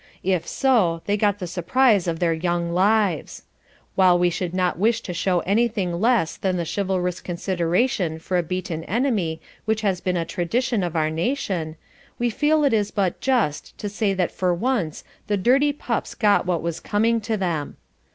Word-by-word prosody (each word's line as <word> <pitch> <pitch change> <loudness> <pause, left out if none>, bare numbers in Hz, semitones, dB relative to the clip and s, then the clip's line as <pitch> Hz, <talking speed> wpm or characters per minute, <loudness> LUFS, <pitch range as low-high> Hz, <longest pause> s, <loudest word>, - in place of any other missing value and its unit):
If 185 -3 0
so, 195 -12 +2
they 205 - +1
got 205 -1 +1
the 190 - -5
surprise 190 +4 +2
of 165 -1 -1
their 170 -1 +1
young 170 +1 -1
lives. 195 -2 +1 0.5
While 185 -2 +5
we 175 0 +2
should 175 0 -3
not 180 -1 0
wish 225 +3 +2
to 180 - -6
show 175 0 +1
anything 205 -3 0
less 225 -8 +2
than 185 -2 -1
the 170 - -2
chivalrous 185 -1 -1
consideration 175 +1 0
for 170 +3 -4
a 175 - +3
beaten 170 -1 -4
enemy 205 -9 0 0.3
which 220 0 0
has 190 -4 0
been 180 -1 0
a 165 - -1
tradition 210 +7 -1
of 175 -2 -3
our 155 -1 +1
nation, 170 - -2 0.4
we 240 0 0
feel 300 +5 +2
it 280 -4 +3
is 210 -2 +1
but 195 -4 -1
just 240 - 0
to 205 - -4
say 205 -1 0
that 180 -2 0
for 180 -1 0
once 205 - -1 0.2
the 205 - +1
dirty 265 +9 +3
pups 250 -5 -3
got 205 -4 +3
what 175 -3 0
was 170 -1 -3
coming 225 +2 +1
to 220 0 -2
them. 170 -6 -2
185 Hz, 180 wpm, -23 LUFS, 175-220 Hz, 0.5 s, While